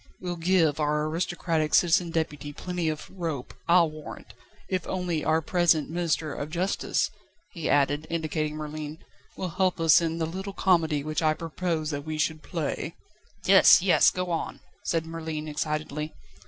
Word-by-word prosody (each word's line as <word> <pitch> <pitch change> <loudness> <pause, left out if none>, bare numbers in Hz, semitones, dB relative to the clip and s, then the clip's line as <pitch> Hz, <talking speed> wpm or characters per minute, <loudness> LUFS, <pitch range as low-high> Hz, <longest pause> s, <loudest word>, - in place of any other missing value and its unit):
We'll 180 -1 -4
give 165 -3 +2
our 150 0 +1
aristocratic 165 -1 0
Citizen 175 0 +4
Deputy 150 -3 -2
plenty 180 0 -2
of 155 -1 -5
rope, 165 -8 -5
I'll 170 -2 +5
warrant, 155 -1 -10 0.3
if 185 -3 -2
only 180 -4 -2
our 160 +1 +2
present 165 -3 +2
Minister 165 -3 -1
of 145 - -5
Justice," 180 +4 0 0.4
he 165 -3 -4
added, 145 +2 +2
indicating 155 -2 -2
Merlin, 155 0 -6 0.4
"will 185 - -3
help 185 +1 0
us 165 0 +6
in 165 0 -1
the 165 - 0
little 190 +4 -5
comedy 165 -7 +2
which 155 +2 -2
I 155 -1 +3
propose 165 -1 -2
that 145 -1 -4
we 155 0 -4
should 155 0 0
play." 160 -4 -3 0.5
"Yes! - - +7
Yes! - - +6
Go 180 -1 -3
on!" 165 - -3 0.2
said 165 -1 0
Merlin 160 -1 -5
excitedly. 150 0 -3
160 Hz, 155 wpm, -27 LUFS, 155-175 Hz, 0.5 s, Yes